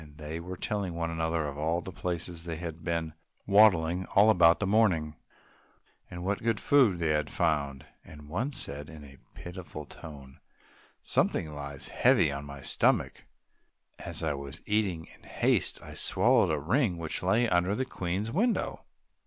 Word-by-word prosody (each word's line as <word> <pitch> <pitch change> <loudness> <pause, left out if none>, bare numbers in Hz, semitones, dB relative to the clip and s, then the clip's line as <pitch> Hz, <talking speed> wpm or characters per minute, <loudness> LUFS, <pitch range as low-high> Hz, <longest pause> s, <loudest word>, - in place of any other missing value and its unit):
They 80 +1 -6
were 90 +2 -7
telling 100 -4 -3
one 85 0 -2
another 80 -1 -1
of 70 0 -5
all 80 +3 0
the 95 - -7
places 85 -1 -4
where 85 - -3
they - - -8
had 85 -1 -6
been 85 -2 -2 0.3
waddling 95 -4 +4
about 100 -5 +7
all 85 - +7
the 105 - -2
morning, 95 -7 +2 0.9
and 90 0 -7
what 100 +1 -1
good 115 -2 0
food 130 -11 +4
they 85 -2 0
had 75 -1 +1
found, 70 -5 -1 0.2
and 75 -1 -13
one 110 - -2
said 75 - -5
in 80 -3 -11
a 70 -1 -14 0.2
pitiful 90 -4 -8
tone, 70 -3 -12 0.6
"Something 75 -2 0
lies 70 -1 -7
heavy 75 - +3
on 70 +1 -5
my 70 -1 -9
stomach; - - +1 0.7
as - - -6
I 80 -2 0
was 70 -1 -8
eating 100 -6 0
in - - -18
haste - - 0
I - - -10
swallowed - - +3
a 75 - +1
ring 95 - +1
which 80 -2 -3
lay 105 +6 +2
under 90 0 +2
the 130 - -1
Queen's 95 0 -3
window." 225 - 0
85 Hz, 170 wpm, -29 LUFS, 75-95 Hz, 0.9 s, about